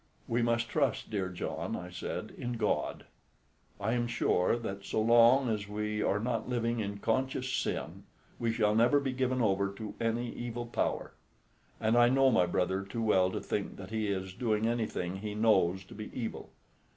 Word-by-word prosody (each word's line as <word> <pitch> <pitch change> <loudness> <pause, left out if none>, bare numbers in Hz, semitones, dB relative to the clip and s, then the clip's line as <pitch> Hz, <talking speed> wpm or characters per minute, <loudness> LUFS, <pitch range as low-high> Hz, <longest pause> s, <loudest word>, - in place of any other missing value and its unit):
"We 120 +1 +1
must 115 0 +1
trust, 140 -2 0
dear 95 -3 -1
John," 90 - -4
I 90 +1 -7
said, 90 - -5
"in 120 - -4
God. 110 -3 -1 0.7
I 105 +3 0
am 120 -1 0
sure 115 -3 +2
that 100 -4 -5
so 110 - -1
long 120 +4 +6
as 105 -3 -1
we 105 +1 -2
are 100 - +1
not 120 +2 -2
living 120 -1 0
in 100 -1 -3
conscious 130 +4 -1
sin, - - -3 0.3
we 115 -1 +1
shall 110 -2 +2
never 120 +6 +4
be 135 -2 -2
given 130 -1 0
over 100 -1 +2
to 110 0 -6
any 115 +1 0
evil 120 0 -4
power; 120 - -2 0.7
and 110 +1 +2
I 120 0 +6
know 135 +1 +4
my 90 - +4
brother 95 +2 0
too 100 +4 -4
well 95 -4 +4
to - - -3
think - - -3
that 95 +1 -9
he 110 -1 -1
is 95 -2 -2
doing 110 -1 0
anything 110 -6 -1
he 105 +1 -5
knows 95 -4 +3
to - - -14
be 110 +1 -7
evil. 115 - -5
110 Hz, 185 wpm, -31 LUFS, 100-120 Hz, 0.7 s, long